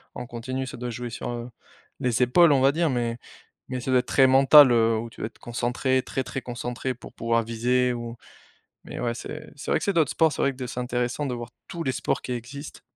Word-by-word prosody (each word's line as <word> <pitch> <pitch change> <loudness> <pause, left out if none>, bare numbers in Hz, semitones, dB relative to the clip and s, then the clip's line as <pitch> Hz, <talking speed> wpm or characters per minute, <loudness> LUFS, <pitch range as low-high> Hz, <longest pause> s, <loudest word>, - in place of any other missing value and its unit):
en - - -5
continu 130 +3 -4
ça 125 - -8
doit 125 0 -4
jouer 120 +1 -5
sur, 115 - -5
heu, 120 0 -5 0.5
les 125 -2 +1
épaules 160 +7 +5
on 135 - +3
va 135 +1 +5
dire 165 +2 +1
mais 120 -3 -1 0.5
mais 130 -1 -4
ça 130 - -2
doit 130 - +5
être - - -3
très 135 - +5
mental, 135 +1 +8
heu, 115 -1 +3
où 115 +1 -4
tu - - -12
dois - - -1
être 115 - -18
concentré, 125 +2 0
très, 135 - -3
très 135 - -5
concentré 125 +1 -4
pour 125 - -13
pouvoir 115 0 0
viser 125 +3 +1
ou 120 -1 -6 0.7
mais - - -7
ouais 120 -1 -1
c'est 150 +6 -8
c'est 140 - -6
vrai - - +3
que - - -5
c'est 200 - +1
d'autres 160 -6 +2
sports 160 -2 +3
c'est - - -2
vrai 140 - +1
que 130 -1 -5
c'est 125 0 -5
intéressant 125 +3 -2
de 125 - -2
voir 120 -1 -7 0.2
tous 170 -1 -5
les 130 - 0
sports - - -1
qui 125 - -4
existent. 125 +5 -7
125 Hz, 245 wpm, -25 LUFS, 120-135 Hz, 0.7 s, mental